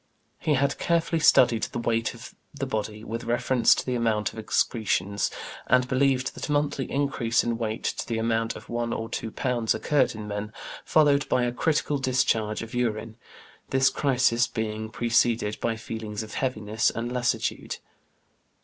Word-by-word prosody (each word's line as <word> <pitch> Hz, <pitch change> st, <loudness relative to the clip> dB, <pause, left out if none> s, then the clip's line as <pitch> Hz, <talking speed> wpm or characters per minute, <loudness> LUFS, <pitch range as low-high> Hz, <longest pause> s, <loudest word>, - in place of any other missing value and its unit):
He 150 Hz, -, +1 dB
had 140 Hz, +1 st, +1 dB
carefully 165 Hz, -1 st, +1 dB
studied 120 Hz, -6 st, +5 dB
the -, -, -3 dB
weight 115 Hz, -1 st, 0 dB
of -, -, -11 dB, 0.2 s
the -, -, -3 dB
body 110 Hz, 0 st, -3 dB
with 115 Hz, +2 st, -5 dB
reference 120 Hz, +1 st, +3 dB
to -, -, -3 dB
the 125 Hz, -, -1 dB
amount 115 Hz, -3 st, 0 dB
of -, -, -8 dB
excretions, 105 Hz, -2 st, 0 dB, 0.4 s
and 125 Hz, 0 st, +4 dB
believed 130 Hz, 0 st, +1 dB
that -, -, -6 dB
a -, -, 0 dB
monthly 145 Hz, -2 st, 0 dB
increase 135 Hz, -5 st, +1 dB
in 120 Hz, -1 st, -2 dB
weight 110 Hz, -1 st, -3 dB
to -, -, -2 dB
the 115 Hz, -, -1 dB
amount 115 Hz, 0 st, 0 dB
of -, -, -11 dB
one 120 Hz, 0 st, -2 dB
or 115 Hz, 0 st, -4 dB
two 115 Hz, -, -3 dB
pounds 120 Hz, -1 st, 0 dB
occurred 145 Hz, -6 st, +1 dB
in 105 Hz, -1 st, -7 dB
men, 105 Hz, +1 st, -4 dB, 0.3 s
followed 145 Hz, -2 st, +3 dB
by 125 Hz, -, +2 dB
a 120 Hz, -, 0 dB
critical 145 Hz, +2 st, 0 dB
discharge 115 Hz, -5 st, +1 dB
of 115 Hz, -, -9 dB
urine, 115 Hz, -2 st, -1 dB, 0.5 s
this 135 Hz, 0 st, +3 dB
crisis 125 Hz, -4 st, +2 dB
being 110 Hz, -1 st, -3 dB
preceded 115 Hz, -2 st, +1 dB
by 115 Hz, -1 st, 0 dB
feelings 110 Hz, -1 st, -5 dB
of 110 Hz, -, -10 dB
heaviness 110 Hz, -4 st, 0 dB
and 120 Hz, +1 st, -4 dB
lassitude. 125 Hz, -1 st, -1 dB
115 Hz, 165 wpm, -26 LUFS, 110-130 Hz, 0.5 s, studied